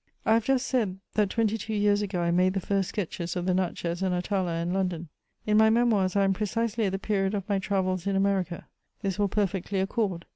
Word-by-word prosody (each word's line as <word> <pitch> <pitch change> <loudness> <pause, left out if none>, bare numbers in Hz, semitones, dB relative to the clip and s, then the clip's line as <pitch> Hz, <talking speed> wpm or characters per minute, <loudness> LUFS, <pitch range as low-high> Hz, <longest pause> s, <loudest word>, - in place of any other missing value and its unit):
I 220 - +4
have 225 -1 +2
just 270 -1 +2
said, 215 -8 0 0.2
that 210 -2 +2
twenty 225 +1 0
two 220 0 -4
years 205 0 +3
ago 190 -3 -2
I 170 0 +1
made 185 +2 +2
the - - +1
first 195 0 -1
sketches 180 -3 -4
of 180 -1 -2
the 185 - +2
Natchez 175 -1 -2
and 185 -1 +1
Atala 180 -1 -1
in 170 +2 -2
London; 180 -4 -2 0.4
in 210 0 +3
my 220 0 +6
Memoirs 220 -5 +2
I 200 - +4
am 195 0 +3
precisely 220 +2 -1
at 195 - 0
the 195 - -1
period 195 0 0
of 200 -2 -4
my 200 -2 +1
travels 185 -2 -1
in 200 - +1
America; 195 -3 0 0.4
this 195 0 -2
will 205 - +3
perfectly 195 -1 -1
accord. 190 -3 -1
195 Hz, 225 wpm, -27 LUFS, 185-210 Hz, 0.4 s, my